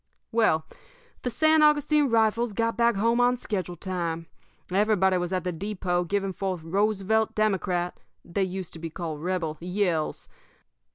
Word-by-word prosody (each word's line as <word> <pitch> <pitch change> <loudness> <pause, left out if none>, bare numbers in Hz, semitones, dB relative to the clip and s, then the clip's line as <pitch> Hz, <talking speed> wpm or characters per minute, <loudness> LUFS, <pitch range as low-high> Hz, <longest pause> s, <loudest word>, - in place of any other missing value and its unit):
"Well, 220 -9 +2 0.6
the 250 - -2
San 315 +6 +4
Augustine 300 -1 +4
Rifles 225 0 +2
got 230 +2 0
back 235 -1 +3
home 230 +4 +2
on 245 0 +3
schedule 185 -6 -3
time. 170 -2 -3 0.5
Everybody 190 -2 +3
was 175 0 -3
at 185 -1 -1
the 180 - -1
depot 180 -1 -2
giving 195 +1 -1
forth 185 -3 -3
Roosevelt 210 +4 +1
Democrat 185 -4 0 0.3
they 175 +3 -2
used 185 -1 -4
to 165 - -7
be 165 0 -5
called 160 -3 -5
Rebel 170 -3 -2
yells. 180 -3 -1
190 Hz, 150 wpm, -26 LUFS, 175-220 Hz, 0.6 s, San